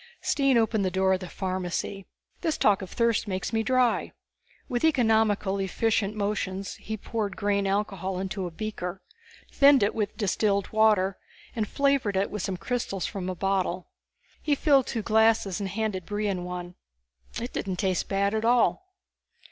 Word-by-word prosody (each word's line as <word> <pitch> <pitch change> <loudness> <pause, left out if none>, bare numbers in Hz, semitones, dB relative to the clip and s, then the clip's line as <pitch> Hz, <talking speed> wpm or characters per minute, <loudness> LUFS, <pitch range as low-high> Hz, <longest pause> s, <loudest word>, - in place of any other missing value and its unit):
Stine 275 -3 +2
opened 220 -2 +2
the 185 - +1
door 190 +1 +2
of 185 - 0
the 185 -2 -7
pharmacy. 185 +1 -3 0.3
"This 320 -2 0
talk 205 -2 +3
of 190 - -7
thirst 230 -2 +1
makes 190 +2 -3
me 225 - +2
dry." 250 +1 +1 0.5
With 240 -1 -2
economically 220 -8 +2
efficient 215 +1 0
motions 200 -2 -2
he 220 0 -5
poured 210 -2 -3
grain 200 -1 +1
alcohol 195 -2 -1
into 190 0 -3
a - - -5
beaker, 185 0 -5 0.5
thinned 280 -4 +6
it 205 - +1
with 210 -2 -2
distilled 200 -1 +1
water 210 -3 +3 0.4
and 220 -3 -1
flavored 275 -8 +1
it 195 - 0
with 210 - -3
some 190 0 -3
crystals 215 -3 -3
from 190 -3 -4
a 185 - -3
bottle. 190 -1 -1 0.5
He 295 -2 +1
filled 275 -3 +3
two 225 - -3
glasses 220 -3 +3
and 200 -1 -3
handed 200 -3 -3
Brion 205 -3 -2
one. 180 0 -6 0.7
It 240 +2 -5
didn't 190 -2 -2
taste 185 -2 -1
bad 200 +1 +1
at 220 0 -1
all. 250 +11 +2
205 Hz, 165 wpm, -27 LUFS, 190-225 Hz, 0.7 s, thinned